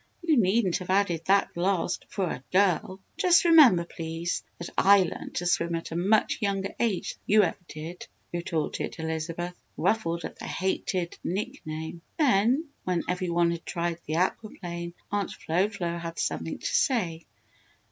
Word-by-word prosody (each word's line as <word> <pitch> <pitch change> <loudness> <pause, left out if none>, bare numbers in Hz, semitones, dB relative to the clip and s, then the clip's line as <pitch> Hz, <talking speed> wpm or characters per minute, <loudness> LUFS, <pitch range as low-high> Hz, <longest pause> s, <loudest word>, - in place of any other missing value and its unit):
"You 325 -3 +3
needn't 200 -4 +3
have 185 - -8
added 185 -4 +1
that 195 +1 +3
last 175 0 0
'for 195 - -2
a 150 -6 -4
girl'; 190 0 +2 0.2
just 350 -1 +5
remember 295 - +7
please, 165 +1 -4
that 170 - -7
I 200 0 +6
learned 170 - -6
to 175 - -2
swim 170 -1 +1
at 165 - -5
a - - -4
much 200 +5 +2
younger 195 -1 -1
age 220 -6 0
than - - -25
you 215 0 +6
ever 180 - -1
did!" 160 +3 -8 0.3
retorted 170 -2 -2
Elizabeth, 160 +2 -3 0.2
ruffled 170 -6 0
at - - -8
the - - -6
hated 185 -2 -2
nick 195 +5 -3
name. 160 +2 -5 0.2
Then, 265 +2 +3
when 180 -2 0
every 180 0 -1
one 170 0 +3
had 170 0 -4
tried 170 -1 -2
the 155 - -1
aqua 190 +5 0
plane 170 -1 -5 0.2
Aunt 205 -2 -1
Flo 180 +6 0
Flo 175 -5 -3
had 170 0 -6
something - - -2
to - - -12
say. 175 -11 +1
180 Hz, 165 wpm, -27 LUFS, 170-200 Hz, 0.3 s, remember